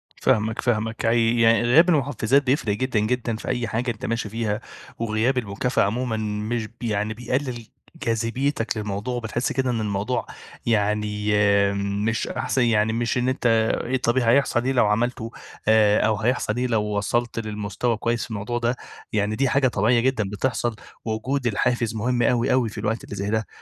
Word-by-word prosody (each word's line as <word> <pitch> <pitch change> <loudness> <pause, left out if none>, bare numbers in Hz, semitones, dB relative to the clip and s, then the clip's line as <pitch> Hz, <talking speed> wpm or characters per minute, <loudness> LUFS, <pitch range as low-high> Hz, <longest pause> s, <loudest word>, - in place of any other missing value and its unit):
فاهمك، 110 -3 +1
فاهمك. 110 -1 -1
عي 115 0 +3
يعني 115 0 +5
غياب 150 +10 +5
المُحفِّزات 140 -4 +2
بيفرق 125 -6 +1
جدًا، 125 -1 0
جدًا، 115 +1 -1
في 110 - -8
أي 120 -2 -1
حاجة 120 +2 -1
أنت 110 - -7
ماشي 115 -2 -2
فيها. 110 -1 -2 0.4
وغياب 115 +3 0
المكافأة 120 +3 0
عمومًا 115 +2 -1
مش 110 +1 -2
ب - - -22
يعني 105 -2 -1
بيقلل 120 0 -3 0.4
جاذبيتك 115 +1 -1
للموضوع. 105 +3 -3
وبتحس 120 +1 -2
كده 130 0 0
إن 115 -2 -1
الموضوع 105 +4 -1 0.4
يعني 105 -1 0 0.4
مش 100 +3 -1
أحسن 130 - -1
يعني 110 -1 +2
مش 120 +1 0
إن 125 +1 +1
أنت 130 - -3 0.4
إيه 130 +2 0
طب 120 0 0
هيحصل 120 0 +3
إيه 130 - +2
لو 125 -4 +3
عملته، 115 +2 0 0.4
آآ 105 -1 +5
أو 110 - +2
هيحصل 115 -1 0
إيه 125 +1 0
لو 110 -3 +1
وصلت 105 +3 -1
للمستوى 105 +1 -2
كويس 115 +1 -1
في - - -8
الموضوع 110 +3 -3
ده. 120 +1 0 0.4
يعني 105 0 0
دي 135 +2 +1
حاجة 140 -1 +3
طبيعية 115 +2 +2
جدًا 125 -3 +1
بتحصل، 120 +2 -1 0.3
ووجود 125 +4 -1
الحافز 115 0 0
مهم 120 +3 0
أوي، 120 -1 +2
أوي 125 -3 +2
في 105 - -12
الوقت 115 +2 -2
اللي - - -7
زي 100 +1 -3
ده. 110 0 -1
115 Hz, 175 wpm, -23 LUFS, 105-125 Hz, 0.4 s, يعني